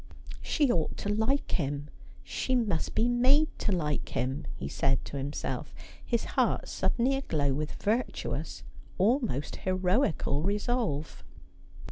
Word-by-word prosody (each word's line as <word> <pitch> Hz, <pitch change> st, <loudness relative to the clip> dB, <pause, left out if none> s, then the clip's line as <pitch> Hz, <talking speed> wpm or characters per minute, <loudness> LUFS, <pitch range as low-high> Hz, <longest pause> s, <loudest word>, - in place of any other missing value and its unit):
' -, -, -9 dB
She 290 Hz, -5 st, +2 dB
ought 165 Hz, -6 st, 0 dB
to 205 Hz, -, -3 dB
like 225 Hz, +7 st, +1 dB
him; 145 Hz, -2 st, -1 dB, 0.4 s
she 260 Hz, -, -1 dB
must 210 Hz, -10 st, 0 dB
be 230 Hz, -, +3 dB
made 260 Hz, +6 st, +4 dB
to 210 Hz, -, 0 dB
like 150 Hz, -6 st, -1 dB
him,' 130 Hz, +2 st, -1 dB
he 65 Hz, -, -5 dB
said 135 Hz, -, +1 dB
to 140 Hz, -, -5 dB
himself, 140 Hz, +2 st, -4 dB, 0.3 s
his 235 Hz, -2 st, 0 dB
heart -, -, +1 dB
suddenly 255 Hz, +3 st, +1 dB
aglow 150 Hz, -, 0 dB
with 150 Hz, +2 st, -3 dB
virtuous, 225 Hz, +5 st, -1 dB, 0.3 s
almost 210 Hz, -, +1 dB
heroical 185 Hz, -, +1 dB
resolve. 205 Hz, -, -1 dB
190 Hz, 130 wpm, -30 LUFS, 145-245 Hz, 0.4 s, made